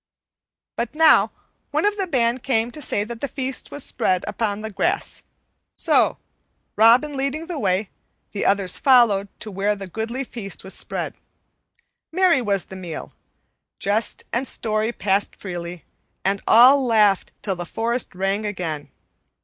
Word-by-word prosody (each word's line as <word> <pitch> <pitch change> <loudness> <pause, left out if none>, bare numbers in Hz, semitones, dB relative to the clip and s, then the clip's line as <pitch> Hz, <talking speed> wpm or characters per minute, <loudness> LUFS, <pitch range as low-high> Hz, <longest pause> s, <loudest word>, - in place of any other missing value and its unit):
But 235 +4 -3
now 320 0 +6 0.4
one - - 0
of 415 0 +2
the 390 -2 -2
band 245 -5 +1
came 240 -3 0
to 300 - -8
say 205 -6 0
that 230 +1 -8
the 280 - -1
feast 265 0 -4
was 290 - -5
spread 185 -1 0
upon 210 -2 -2
the 220 0 -5
grass; 195 - -1 0.5
so, - - +2 0.6
Robin 245 +7 +5
leading 275 +4 -2
the 340 -3 -5
way, 190 0 0 0.4
the 205 - -3
others 195 -2 +1
followed 235 -7 +5
to 215 - -6
where 200 +2 0
the 195 -1 -7
goodly 225 +7 -4
feast 220 -6 -6
was 190 - -7
spread. - - -4 1.0
Merry 355 -5 +3
was 200 -5 0
the 190 - -10
meal. 175 -4 -7 0.6
Jest 210 +3 -1
and 255 +3 +1
story 215 +1 0
passed 200 -3 0
freely, 175 -2 -7 0.4
and 195 +1 +1
all 260 +5 +7
laughed 215 -5 +3
till 195 -3 -1
the 175 - -5
forest 230 +5 -2
rang 195 +3 -1
again. 175 -8 -4
220 Hz, 150 wpm, -22 LUFS, 195-255 Hz, 1.0 s, all